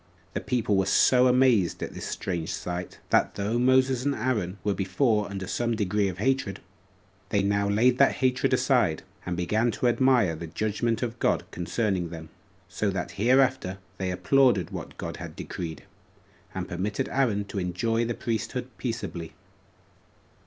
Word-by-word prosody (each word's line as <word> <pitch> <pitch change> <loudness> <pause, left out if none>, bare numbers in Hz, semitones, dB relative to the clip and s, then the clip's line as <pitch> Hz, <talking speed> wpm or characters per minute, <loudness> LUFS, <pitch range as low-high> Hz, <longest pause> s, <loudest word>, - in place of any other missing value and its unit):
The - - -2
people 115 -5 0
were 95 0 +1
so 125 +6 +5
amazed 125 -8 +3
at - - -5
this - - -6
strange 85 -4 -3
sight, 90 0 -5
that - - +3
though 105 +4 -1
Moses 130 0 +3
and 140 0 0
Aaron 110 -6 -1
were 105 - +1
before 105 +3 +1
under 95 -1 -5
some 120 +4 -1
degree 105 -1 +1
of 90 -2 -4
hatred, 110 -2 0 0.7
they 100 -1 +1
now 100 0 +1
laid 120 +5 +3
that 140 - +5
hatred 130 0 +1
aside, 125 - +2 0.2
and 90 -1 -2
began 105 +7 +1
to 120 +2 0
admire 120 -8 +3
the 85 +1 -7
judgment 110 +6 -1
of 120 0 -4
God - - +1
concerning 90 0 -1
them; 80 -1 -9 0.4
so 100 +3 -1
that 95 -2 -3
hereafter 125 -3 +2 0.2
they 95 -1 -1
applauded 100 +1 +3
what - - -7
God - - -5
had - - -8
decreed, 80 -2 -6 0.7
and - - -3
permitted 100 +8 -2
Aaron 115 -7 +1
to 100 - -4
enjoy 105 +6 0
the 120 0 -2
priesthood 115 -2 -3
peaceably. 85 -2 -4
105 Hz, 160 wpm, -27 LUFS, 95-125 Hz, 0.7 s, so